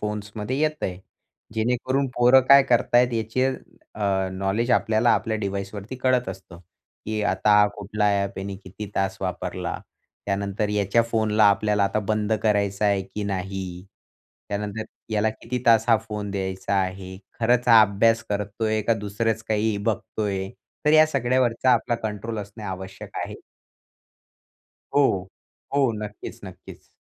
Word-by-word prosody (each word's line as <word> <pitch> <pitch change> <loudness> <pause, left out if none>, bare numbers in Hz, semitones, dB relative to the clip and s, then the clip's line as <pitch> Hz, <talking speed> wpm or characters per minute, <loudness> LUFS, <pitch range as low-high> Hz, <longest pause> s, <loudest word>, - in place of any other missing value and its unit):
फोन्समध्ये 105 +4 -4
येत 155 0 0
आहे, 90 -1 -2 0.6
जेणेकरून 125 +4 0
पोरं 125 +2 +6
काय 140 0 +9
करत 120 -2 +1
आहेत 125 0 +5
याचे 115 +3 0 0.5
अ, 95 -2 0
नॉलेज 100 +6 -1
आपल्याला 115 0 +3
आपल्या 110 -1 -1
डिव्हाइसवरती 100 +3 -5
कळत 125 -3 +1
असतं. 95 -2 -9 0.5
की 110 -1 -2
आता 105 +1 +4
कुठला 105 +1 -2 0.2
ॲप 100 -1 -5
याने 95 0 -5
किती 100 +2 -9
तास 95 0 0
वापरला? 90 -1 -3 0.5
त्यानंतर 100 +1 -1
याच्या 105 +2 +2
फोनला 110 -1 +2
आपल्याला 105 0 +1
आता 100 +2 0
बंद 110 0 0
करायचं 105 -1 +1
आहे, 100 -1 +2
की 95 +2 -6
नाही? 95 -2 -4 0.6
त्यानंतर 105 +2 -3 0.3
याला 105 +1 +2
किती 115 +3 -5
तास 115 -1 +6
हा 115 - +6
फोन 105 -1 -4
द्यायचा 95 0 -3
आहे? 95 0 -4 0.2
खरंच 120 +2 +2
हा 115 -2 +9
अभ्यास 115 +3 +2
करतोय 105 +2 -1
का 115 +2 +2
दुसरंच 110 +2 -2
काही 110 0 +1
बघतोय? 100 -2 -2 0.4
तर 150 - +4
या 155 0 +7
सगळ्यावरचा 130 -3 +1
आपला 120 0 +1
कंट्रोल 110 0 -4
असणे 105 +2 -8
आवश्यक 95 -1 -7
आहे. - - -9 1.5
हो, 100 -10 +2 0.5
हो. 135 -4 +3
नक्कीच 105 0 -8
नक्कीच. - - -12
105 Hz, 140 wpm, -24 LUFS, 100-115 Hz, 1.5 s, काय